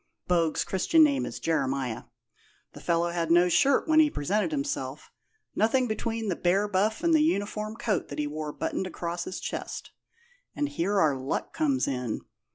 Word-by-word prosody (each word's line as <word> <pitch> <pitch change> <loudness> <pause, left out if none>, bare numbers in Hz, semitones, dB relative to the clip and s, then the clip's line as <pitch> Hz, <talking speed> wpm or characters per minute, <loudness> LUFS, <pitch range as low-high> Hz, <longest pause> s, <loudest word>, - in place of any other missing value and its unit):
(Bogue's 170 -3 +2
Christian 315 - +3
name 280 -3 +2
is - - -6
Jeremiah). 135 -6 -1 0.7
The - - -11
fellow 170 0 +1
had 170 -1 -2
no 175 +1 +5
shirt 275 - +3
when 315 0 +5
he 310 -1 +6
presented 205 - 0
himself 285 -2 -4 0.4
nothing 245 +4 +2
between 225 0 -2
the 185 - 0
bare 190 +5 +1
buff 205 - 0
and 335 -1 +3
the 310 - +5
uniform 215 -7 -1
coat 220 -5 -1
that 145 - -8
he 150 - 0
wore 150 +1 -4
buttoned 190 - -3
across 170 -1 -4
his 185 - -5
chest. - - -5 0.6
And 290 -1 -1
here 205 -7 0
our 155 -6 +3
luck 130 +1 -3
comes 285 -4 +1
in. 125 -4 -2
195 Hz, 170 wpm, -27 LUFS, 165-265 Hz, 0.7 s, he